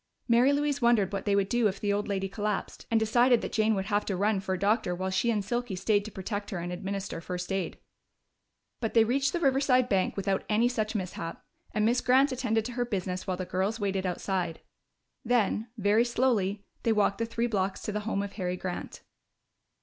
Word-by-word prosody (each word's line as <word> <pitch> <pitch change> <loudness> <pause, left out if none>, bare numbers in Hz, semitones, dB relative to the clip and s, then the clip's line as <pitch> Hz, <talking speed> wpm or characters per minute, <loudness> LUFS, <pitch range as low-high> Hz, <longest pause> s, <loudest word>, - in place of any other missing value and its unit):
Mary 240 +3 +5
Louise 285 -1 0
wondered 225 -5 +3
what 195 -1 -3
they 200 -1 +2
would 200 -1 +2
do 240 +1 +2
if 195 -1 -3
the 205 -1 0
old 205 +1 -1
lady 195 -1 -1
collapsed, 205 +1 -3
and 230 - +3
decided 240 +2 +4
that - - -4
Jane 220 0 +2
would 190 -1 -2
have 205 0 +1
to 195 - -1
run 205 +2 +1
for 190 -1 -2
a - - -6
doctor 200 -2 +1
while 190 +1 -2
she 235 +5 +1
and 210 -4 0
Silky 240 -2 -2
stayed 205 +2 +1
to 215 - -7
protect 205 +2 -4
her 190 - -4
and 175 +1 -4
administer 195 -1 -4
first 180 +2 -5
aid. 190 -4 -2 1.0
But 225 -1 -3
they 225 - +7
reached 270 +5 +1
the 345 - -1
Riverside 265 -4 +3
bank 195 -1 +1
without 195 -1 0
any 220 +3 +3
such 220 -3 -2
mishap, 180 -4 -5 0.3
and 215 0 +1
Miss 240 +3 +2
Grant 265 +3 +4
attended 225 -4 0
to 250 - -4
her 245 0 -1
business 185 -5 -3
while 185 -1 -1
the 185 - -3
girls 195 +6 -1
waited 195 -2 -1
outside. 180 -2 -2 0.6
Then, 225 -2 +1
very 210 +2 +3
slowly, 225 -5 0 0.2
they 230 - +1
walked 210 -1 +2
the 230 - -1
three 230 +1 -1
blocks 195 -4 -1
to - - -2
the 210 - -2
home 205 -2 -2
of 200 - -6
Harry 180 -3 -2
Grant. 180 -1 -6
210 Hz, 215 wpm, -29 LUFS, 190-235 Hz, 1.0 s, they